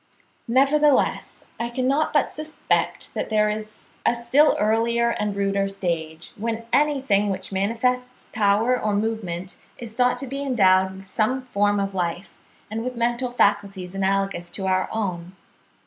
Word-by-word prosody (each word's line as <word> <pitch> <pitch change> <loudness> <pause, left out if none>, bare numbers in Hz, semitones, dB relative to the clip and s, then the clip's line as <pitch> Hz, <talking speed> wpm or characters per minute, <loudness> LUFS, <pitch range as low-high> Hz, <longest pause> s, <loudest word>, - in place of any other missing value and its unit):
Nevertheless 275 +3 +2 0.2
I 235 0 -2
cannot 265 +5 0
but 295 - +2
suspect 310 +1 -2
that - - -3
there 210 -1 +2
is 215 0 -8
a - - +3
still 250 +6 +3
earlier 230 +2 +2
and 210 -3 -2
ruder 195 0 0
stage, 165 -4 -4
when 230 +1 -3
anything 270 -9 +2
which 190 0 -4
manifests 250 +6 -1
power 215 +4 +3
or 210 -1 0
movement 200 -4 -3 0.2
is 235 -2 -8
thought 250 +1 +2
to 275 - -5
be 275 +2 -5
endowed 190 -8 +3
with 195 0 -12
some 255 +6 0
form 205 -4 +1
of 195 0 -2
life, 175 0 -3 0.3
and 225 +1 -3
with 250 0 -4
mental 240 +2 0
faculties 200 -5 0
analogous 195 -2 -1
to 190 +2 -5
our 185 0 +1
own.) 180 -5 -3
215 Hz, 145 wpm, -23 LUFS, 195-245 Hz, 0.3 s, a